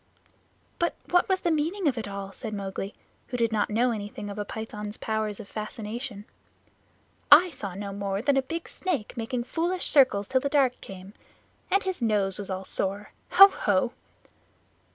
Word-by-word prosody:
"But 340 - +1 0.2
what 355 +1 +3
was 375 -1 +2
the 345 - +1
meaning 325 +4 0
of 275 - +2
it 225 -3 -4
all?" 200 -1 -6
said 215 +2 -6
Mowgli, 195 0 -5 0.3
who 245 - -4
did 230 -1 +1
not 215 -2 +1
know 240 +4 +2
anything 205 -1 -5
of 200 - -7
a - - 0
python's 210 0 -6
powers 215 -2 -2
of 215 - -9
fascination. 215 0 -6 1.1
"I 340 +5 +9
saw 200 - -6
no 200 0 -5
more 200 +1 -2
than 280 +1 +3
a 270 - +4
big 330 +5 -5
snake 360 - -3
making 235 +1 -2
foolish 345 +7 -1
circles 255 -9 +5
till 260 -1 +2
the 280 - -1
dark 270 -3 +2
came. 190 +1 -10 0.6
And 395 +1 +2
his 375 -6 -3
nose 205 -4 +1
was 200 - -5
all 190 0 -4
sore. 200 +3 -2 0.2
Ho! 390 +2 +11
Ho!" 205 - 0
220 Hz, 175 wpm, -27 LUFS, 200-280 Hz, 1.1 s, Ho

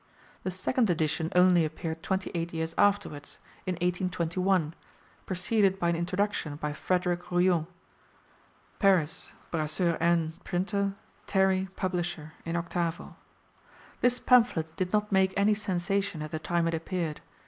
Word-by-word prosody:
The - - -2
second 215 +5 0
edition 160 -1 0
only 180 -1 +6
appeared 160 +1 -4
twenty 190 +1 -2
eight 170 0 -3
years 160 0 -2
afterwards, 200 -8 +1 0.3
in 185 - +1
1821, 180 -1 0 0.5
preceded 190 +1 +1
by 170 -3 +1
an 170 - +2
introduction 175 -2 -1
by 150 0 -3
Frederick 180 +2 -1
Royou 175 -2 +2 1.1
(Paris: 185 -6 +2 0.2
Brasseur 165 +2 0
Aine, 165 -1 +2
printer, 195 +2 -1 0.3
Terrey, 190 -1 +2
publisher, 175 -4 -3
in 165 0 -2
octavo). 170 0 -2 0.8
This 245 0 +3
pamphlet 225 -13 +3
did 185 -1 -2
not 210 0 +1
make 190 -1 +3
any 205 +2 +4
sensation 195 -3 -1
at 155 - -7
the 155 - -3
time 170 +1 0
it 165 - 0
appeared. 165 -1 -3
175 Hz, 130 wpm, -29 LUFS, 165-190 Hz, 1.1 s, only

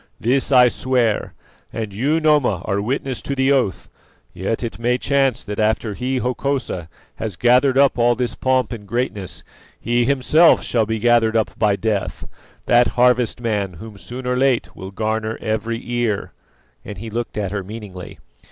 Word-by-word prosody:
This 130 +5 0
I 125 -2 +7
swear, 120 -3 0 0.4
and 110 -3 -5
you, 140 +10 +1
Noma, 145 - +2
are 100 0 -1
witness 130 +3 -2
to 140 - -3
the 135 +1 +2
oath. 130 -8 0 0.5
Yet 100 +7 -3
it 115 - -5
may 120 +1 +1
chance 135 -2 +1
that 105 0 -6
after 110 0 0
he, 130 +5 -2
Hokosa, 125 - -2 0.3
has 110 -5 -4
gathered 125 +5 +3
up 140 -3 +4
all 120 +1 +4
this 120 -2 -1
pomp 130 -3 0
and 105 -3 -9
greatness, 105 -4 -3 0.4
he 120 0 +1
himself 140 +5 +4
shall 115 -3 0
be 110 0 -1
gathered 115 -1 +3
up 110 - 0
by 105 -2 +3
Death, 105 -2 -3 0.4
that 120 0 +4
harvest 125 -1 +3
man 105 -5 -1
whom 105 +5 -10
soon 125 +6 -8
or 125 0 0
late 130 -1 +1
will 95 - -8
garner 110 +2 -2
every 110 +1 -2
ear;" 120 -4 -1 0.5
and 105 - -8
he 110 +3 -7
looked 115 -1 -4
at 100 -3 -2
her 100 -1 -3
meaningly. 100 -3 -9
115 Hz, 170 wpm, -20 LUFS, 105-125 Hz, 0.5 s, I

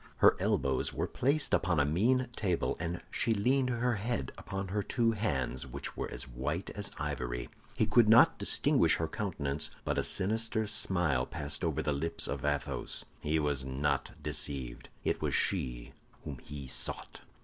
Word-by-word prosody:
Her - - +6
elbows 65 -1 +1
were - - 0
placed 140 +3 0
upon 85 -3 +2
a 70 - +4
mean 120 - +2
table, 90 -5 0
and 85 0 -3
she 115 - +2
leaned 125 +5 +2
her 120 -1 0
head 100 - -2
upon 95 0 -5
her 105 +2 0
two 115 +2 +1
hands, 70 - -1
which 70 +2 -6
were - - -3 0.2
white 75 +9 -3
as 105 -1 -1
ivory. 60 -5 -3 0.3
He - - +3
could 120 -3 +4
not 115 +2 +7
distinguish - - +4
her 80 - -1
countenance, 80 -7 -2 0.2
but - - 0
a - - +1
sinister 110 +3 -1
smile 90 - +1
passed 75 0 -1
over - - 0
the 75 - +1
lips 80 +4 0
of - - -4
Athos. 75 -1 -1 0.2
He 75 +1 +1
was 75 -3 0
not 65 +3 -1
deceived; 65 -4 -3
it - - 0
was - - 0
she - - 0 0.3
whom 70 -4 -6
he 70 0 -8
sought. 65 - -1
80 Hz, 165 wpm, -32 LUFS, 70-110 Hz, 0.3 s, not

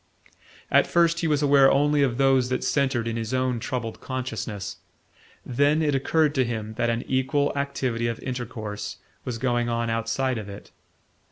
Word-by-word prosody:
At - - +5
first 170 -1 +3
he 165 - 0
was 150 -1 +1
aware 140 -1 +6
only 145 +1 +3
of 125 -4 +1
those 135 -2 +3
that 130 - -1
centred 130 -5 +1
in 115 0 -2
his 115 +2 -2
own 130 -2 0
troubled 120 -2 -4
consciousness; 115 -6 -4 0.7
then 145 +5 +2
it 145 -2 +1
occurred 150 +2 +2
to 135 -3 +2
him 110 -2 -4
that 120 +1 0
an 115 +1 -1
equal 135 +2 +1
activity 130 -4 -1
of 115 -1 -3
intercourse 115 -5 -5 0.3
was 120 -2 -3
going 120 -1 0
on 115 0 -1
outside 115 +2 -1
of 105 -1 -8
it. 100 - -10
130 Hz, 170 wpm, -25 LUFS, 115-140 Hz, 0.7 s, aware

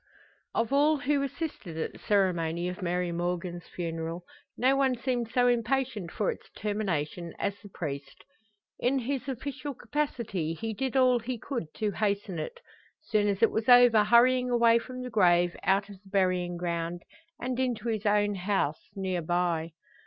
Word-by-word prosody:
Of 230 +3 0
all 295 +2 +4
who 285 0 +1
assisted 275 - -5
at 160 - -3
the - - -13
ceremony 175 -4 +1
of 180 +3 -5
Mary 180 0 -1
Morgan's 175 0 -3
funeral, 165 0 -4 0.3
no 260 +2 +3
one 265 -2 +2
seemed 245 -2 -1
so 245 +1 +3
impatient 240 -4 0
for 210 - 0
its - - -11
termination 175 -5 -2
as 200 0 -2
the 205 - -12
priest. 140 -6 -6 0.6
In 260 +3 +2
his 265 +2 -2
official 280 +2 -5
capacity 230 - -2
he 225 +6 -4
did 265 +4 -1
all 255 -2 +5
he 245 +2 -4
could 230 - -5
to 215 -2 -1
hasten 200 -4 -1
it; 480 - -5 0.4
soon 210 -7 +1
as 200 +1 0
it 230 - +5
was 220 +2 -1
over 245 -3 +8
hurrying 250 +3 +5
away 235 -1 +5
from 255 +1 -7
the 250 - -6
grave, 175 -4 +4
out 195 +1 +2
of 200 -2 -11
the 195 - -18
burying 185 -2 +1
ground, 170 0 -3 0.4
and 250 0 -3
into 240 -3 -1
his 220 -2 -1
own 205 0 +3
house, 185 -6 -1
near 190 -2 -1
by. 170 -1 0
210 Hz, 165 wpm, -29 LUFS, 175-245 Hz, 0.6 s, over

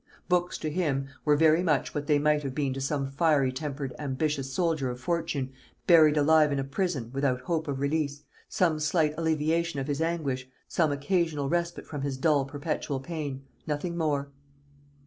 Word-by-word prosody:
Books 180 0 +1
to 155 - -3
him 145 -5 -1
were 150 -1 +4
very 160 +2 +5
much 155 -6 +1
what 145 -1 -3
they 150 - +4
might 150 0 +2
have 135 -3 -5
been 140 -3 0
to 135 - -5
some 135 0 -1
fiery 140 -3 +3
tempered 140 -1 -4
ambitious 140 -1 -2
soldier 155 -2 0
of 125 0 -5
fortune 145 -2 -2 0.3
buried 155 -3 +6
alive 150 0 +5
in 140 - 0
a 135 - 0
prison, 140 - -2
without 135 -2 0
hope 165 -1 -2
of 140 -2 -2
release, 145 0 -1 0.3
some 165 -4 +1
slight 155 0 +2
alleviation 160 0 0
of 135 - -2
his 145 +1 -2
anguish, 140 -6 -1 0.2
some 160 -3 +1
occasional 150 -1 0
respite 170 +1 -1
from 145 -3 -6
his 140 -1 -2
dull 145 -1 +2
perpetual 145 -1 -3
pain; 140 -2 -5 0.2
nothing 155 +3 -2
more. 145 -4 -1
150 Hz, 175 wpm, -28 LUFS, 135-160 Hz, 0.3 s, buried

